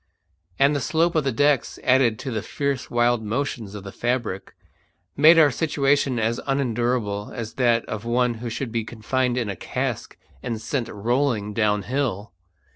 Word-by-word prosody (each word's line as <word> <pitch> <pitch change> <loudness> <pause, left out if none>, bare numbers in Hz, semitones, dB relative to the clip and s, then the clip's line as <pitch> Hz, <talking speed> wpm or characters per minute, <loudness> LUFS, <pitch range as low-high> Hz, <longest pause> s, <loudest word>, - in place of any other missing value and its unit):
And 140 +2 +4
the - - +1
slope 165 +4 +1
of 155 -3 +1
the 135 - +1
decks, 145 +2 +1
added 125 -4 +3
to 130 - -5
the 110 -2 -2
fierce 140 +1 -3
wild 120 -1 +2
motions 110 -2 -3
of 100 - -7
the 100 - -8
fabric, 120 -5 -3 0.6
made 155 +4 +7
our 150 -3 +6
situation 140 -2 +1
as 115 +1 0
unendurable 120 -6 -1
as 115 -2 -5
that 115 -2 +3
of 105 -1 -5
one 120 +1 +1
who 120 - -3
should 115 +1 -4
be 115 -1 -1
confined 120 +3 -1
in 120 -3 -1
a 100 - -3
cask - - -4 0.2
and 115 -2 -3
sent 120 +2 -2
rolling 115 -1 -1
downhill. 105 +1 -1
120 Hz, 165 wpm, -23 LUFS, 110-135 Hz, 0.6 s, made